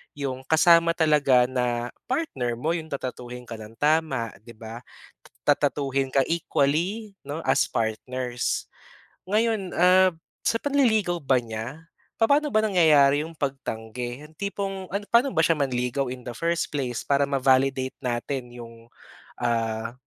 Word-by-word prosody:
yung 135 -2 -4
kasama 170 +1 +5
talaga 150 -6 +4
na 125 -1 -2 0.2
partner 135 - -1
mo, 155 +8 -1
yung 165 -2 -3
tatratuhin 125 -3 -6
ka 115 -2 -8
nang 110 +1 -11
tama 145 -5 +1
'di 115 0 -14
ba, 115 +1 -8 0.7
tatratuhin 140 -2 +1
ka 135 - +4
equally 170 +6 0
'no, 145 +3 -5
as 130 - +3
partners. 120 +2 -2 0.6
Ngayon 215 -3 0
ah 185 +1 +5 0.3
sa 230 - +3
panliligaw 220 -11 +2
ba 130 -2 +3
niya, 115 +7 -6 0.4
papa'no 285 +6 +4
ba 215 - +4
nangyayari 150 -7 +5
yung 165 - -11
pagtanggi? 125 -2 -4
Yung 155 - -22
tipong 195 -1 -4
ano 200 +1 -2
pa'no 240 +4 +4
ba 160 - +3
siya 165 -2 +2
manligaw 130 0 -1
in 125 - -12
the 120 - -4
first 170 0 -1
place, 125 -4 -2
para 140 0 +3
ma-validate 130 -1 +2
natin 125 +1 -3
yung 115 -1 -11 0.6
ah 115 -1 -1
140 Hz, 140 wpm, -25 LUFS, 125-170 Hz, 0.7 s, kasama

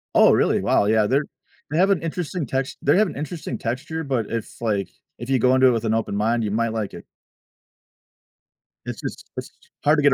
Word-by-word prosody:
Oh - - +7
really? - - +3
Wow, - - +3
yeah, 110 0 +3
they're 140 +5 +2 0.5
they 155 - -1
have 195 +2 +4
an 185 - +2
interesting 165 -2 -3
text 135 +1 -2
they 145 +6 +4
have 215 -1 +4
an - - -7
interesting 150 -5 -4
texture, 145 +7 -3
but 130 -6 -1
it's 115 -2 -5
like, 100 -5 0 0.3
if 120 +2 -7
you 135 - +3
go 125 +2 +4
into 130 0 +6
it - - +6
with 115 -1 -1
an 110 - +1
open 110 -3 -1
mind, 115 +2 +1
you 105 - -1
might 115 +1 0
like 110 -3 -3
it. - - -10 1.8
It's - - -6
just - - -7
it's - - -5 0.3
hard 150 +1 +4
to 145 - +1
get 145 -2 +6
130 Hz, 220 wpm, -23 LUFS, 110-150 Hz, 1.8 s, Oh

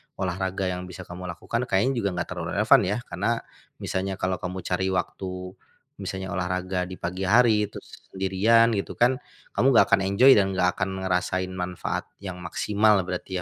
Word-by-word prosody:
olahraga 95 0 -2
yang 90 0 -5
bisa 90 +1 -9
kamu 90 +1 -8
lakukan 115 +8 -3
kayaknya 105 +8 +2
juga 100 -2 0
enggak 90 -1 -2
terlalu - - -4
relevan, - - +5
ya? 105 +4 0
Karena 95 +7 -2 0.5
misalnya 95 +1 -2
kalau 95 -1 -2
kamu 90 0 -5
cari 95 +2 -1
waktu, 90 0 -3 0.5
misalnya 95 0 -4
olahraga 90 0 -1
di 95 - -7
pagi 90 +3 -3
hari, 110 -1 +4
terus - - -10 0.2
sendirian 100 +5 +3
gitu 100 - -3
kan, 125 +2 +3 0.4
kamu 130 - +3
enggak - - +7
akan 100 - +5
enjoy, 125 +8 +6
dan 95 -2 +2
enggak 90 -1 +2
akan 95 - 0
ngerasain 95 0 -1
manfaat 90 -1 -4 0.2
yang 90 -2 -6
maksimal 105 +3 +2
berarti, 90 +1 -4
95 Hz, 170 wpm, -25 LUFS, 90-100 Hz, 0.5 s, enggak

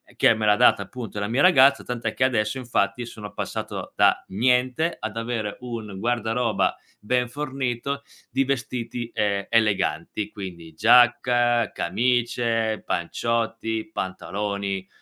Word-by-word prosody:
che - - +5
me 110 -1 -2
l'ha 105 - +5
data, 100 - +4
appunto, 110 0 -7
la 100 - -2
mia 120 +6 +1
ragazza. 140 -6 +6
Tant'è 120 -1 -3
che 130 - 0
adesso, 110 -2 +1
infatti, 120 -2 -1
sono 105 -3 -9
passato - - -5
da - - +4
niente 125 - +1
ad 110 0 -5
avere 115 -3 -3
un 115 -6 -6
guardaroba 115 0 0 0.2
ben 125 +3 0
fornito 135 0 -3 0.3
di 135 0 +1
vestiti, 120 -2 -3
ehm, 100 -1 0
eleganti 105 -1 0
quindi: 85 -4 -8
giacca, 120 +2 +4
camicie, 115 -2 0
panciotti, 115 - -2
pantaloni, 100 - -3
115 Hz, 125 wpm, -24 LUFS, 105-125 Hz, 0.3 s, ragazza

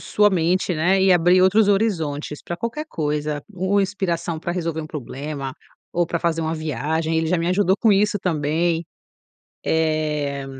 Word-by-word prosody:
sua 210 0 +3
mente, 180 +1 +1
né, 185 +5 +2
e 190 -1 +5
abrir 180 +2 +5
outros 205 +2 +4
horizontes 160 -9 0
para 175 - -5
qualquer 235 - -4
coisa. 150 - -2
U 190 +1 -1
u 200 - +5
inspiração 175 -4 -2
para 170 +2 -3
resolver 165 -2 -2
um 155 - -6
problema 140 -1 -6 0.4
ou 175 -1 +1
pra 170 - -2
fazer 165 -1 0
uma 160 +1 -1
viagem. 160 +1 -2
Ele 160 - +1
já 180 +3 +2
me 170 +1 -1
ajudou 190 0 +2
com 220 -1 +3
isso 205 +1 +2
também. 165 0 0 0.8
Eh, 150 -3 0
170 Hz, 170 wpm, -22 LUFS, 155-190 Hz, 0.8 s, e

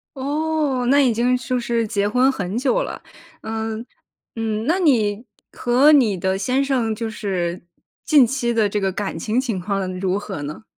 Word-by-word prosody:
哦， 290 -1 -1
那 285 +2 +5
已 255 -4 +3
经 245 +3 +2
就 250 0 -2
是 235 -1 -1
结 205 -1 0
婚 250 +5 +3
很 200 -5 -4
久 290 - +1
了， - - -7 0.4
嗯， 220 +1 -4 0.5
嗯， 220 -1 -2
那 335 +7 +1
你 230 - +2 0.3
和 255 +5 +4
你 240 -10 +4
的 190 +2 0
先 255 +7 0
生， 250 -5 0
就 225 +1 -4
是， 185 -5 -3 0.4
近 295 -5 +6
期 240 -1 -1
的 220 -3 +2
这 210 - -1
个 195 -1 -1
感 195 -4 -4
情 220 +8 0
情 230 -8 -3
况 185 -1 -3
如 190 0 0
何 200 -6 -6
呢？ 150 +9 -7
230 Hz, 190 characters per minute, -21 LUFS, 205-260 Hz, 0.5 s, 近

